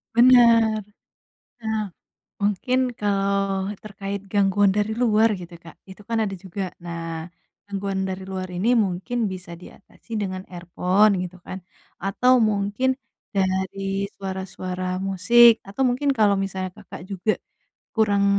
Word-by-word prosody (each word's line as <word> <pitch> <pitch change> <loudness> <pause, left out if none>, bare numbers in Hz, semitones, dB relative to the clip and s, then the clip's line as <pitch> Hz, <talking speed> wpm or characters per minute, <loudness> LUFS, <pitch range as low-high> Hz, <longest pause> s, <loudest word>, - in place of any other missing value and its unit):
Benar. 230 -3 +6 0.8
Nah, 220 -4 -2 0.5
mungkin 245 +5 0
kalau 195 -2 0 0.2
terkait 200 -1 -5
gangguan 200 0 +3
dari 210 +2 0
luar, 225 -2 +3
gitu, 175 -2 -8
Kak. 165 0 -14 0.2
Itu 195 +2 -13
kan 230 -1 0
ada 195 -3 -1
juga. 190 +1 -5 0.2
Nah, 165 -1 -5 0.4
gangguan 195 -1 -2
dari 190 0 -5
luar 185 -1 -3
ini 225 +8 +2
mungkin 215 +4 0
bisa 180 -3 -6
diatasi 210 +4 -9
dengan 185 -1 -4
earphone, 185 +3 +2
gitu 180 0 -11
kan. 185 0 -8 0.3
Atau 245 +7 +3
mungkin, 215 +3 +1 0.4
dari 195 +1 -1
suara-suara 185 -1 -4
musik. 220 +5 +6
Atau 200 +7 -5
mungkin 275 +3 +1
kalau 210 -5 +3
misalnya 190 -1 -3
Kakak 185 +4 -11
juga 195 +2 -1 0.5
kurang 205 -3 +3
195 Hz, 125 wpm, -23 LUFS, 185-220 Hz, 0.8 s, Benar